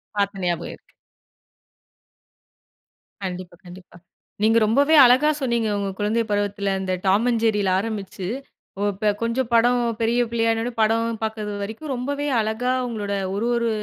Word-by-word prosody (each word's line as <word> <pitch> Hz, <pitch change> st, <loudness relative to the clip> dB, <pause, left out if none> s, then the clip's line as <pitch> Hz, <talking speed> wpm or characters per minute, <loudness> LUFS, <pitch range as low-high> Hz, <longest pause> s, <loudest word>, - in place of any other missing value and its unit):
பாத்த 200 Hz, -1 st, -1 dB
ஞாபகம் 175 Hz, -1 st, -2 dB
இருக்கு. -, -, -30 dB, 2.3 s
கண்டிப்பா 180 Hz, -1 st, -6 dB
கண்டிப்பா. 180 Hz, 0 st, -13 dB, 0.5 s
நீங்க 225 Hz, +1 st, +4 dB
ரொம்பவே 280 Hz, +8 st, +3 dB
அழகா 260 Hz, +5 st, +5 dB
சொன்னீங்க. 235 Hz, -3 st, 0 dB
உங்க 200 Hz, -1 st, -2 dB
குழந்தை 220 Hz, +3 st, +1 dB
பருவத்துல 200 Hz, -1 st, 0 dB
இந்த 185 Hz, -1 st, -2 dB
டாம் 205 Hz, +5 st, +3 dB
அண்ட் 230 Hz, -2 st, 0 dB
ஜெர்ரியில 210 Hz, -4 st, +2 dB
ஆரம்பிச்சு, 200 Hz, -4 st, -5 dB, 0.5 s
ஓ -, -, -3 dB
இப்ப 210 Hz, +2 st, 0 dB
கொஞ்சம் 230 Hz, +1 st, -1 dB
படம் 240 Hz, +1 st, +4 dB, 0.2 s
பெரிய 235 Hz, +2 st, +2 dB
பிள்ளையான 225 Hz, -1 st, +1 dB
உடனே 245 Hz, 0 st, -4 dB
படம் 225 Hz, +1 st, +1 dB
பாக்குறது 215 Hz, -1 st, -3 dB
வரைக்கும், 225 Hz, +8 st, -6 dB
ரொம்பவே 285 Hz, +4 st, -3 dB
அழகா, 225 Hz, +4 st, -1 dB
உங்களோட 205 Hz, -3 st, -4 dB, 0.2 s
ஒரு 225 Hz, +4 st, -1 dB
ஒரு 235 Hz, -1 st, 0 dB
220 Hz, 140 wpm, -23 LUFS, 200-235 Hz, 2.3 s, அழகா